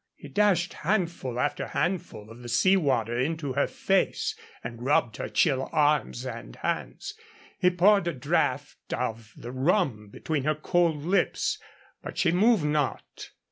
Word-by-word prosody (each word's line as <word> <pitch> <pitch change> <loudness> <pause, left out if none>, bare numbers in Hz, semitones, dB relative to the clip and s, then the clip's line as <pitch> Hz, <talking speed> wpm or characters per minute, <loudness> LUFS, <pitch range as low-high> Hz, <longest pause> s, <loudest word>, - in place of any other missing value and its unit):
He - - -12
dashed 195 -4 +2
handful 170 - -1
after 145 - -1
handful 130 - -3
of 115 - -12
the 120 - -8
sea 185 +11 +4
water 130 - +1
into 145 0 -1
her 140 - +1
face 195 -1 0 0.3
and 120 0 -7
rubbed 125 -5 +2
her - - -4
chill 135 -5 +1
arms 145 -4 +1
and 115 - -7
hands. - - -3 0.5
He 180 - +5
poured 185 +1 +4
a 170 - 0
draught 125 - -1
of 110 -1 -4
the 120 - -8
rum 130 - 0
between 145 +6 -3
her 155 +2 +1
cold 160 -1 +1
lips. 185 +5 +1 0.4
But - - -8
she 170 - +3
moved 200 -1 +3
not. 150 -2 -2
150 Hz, 150 wpm, -27 LUFS, 125-175 Hz, 0.5 s, He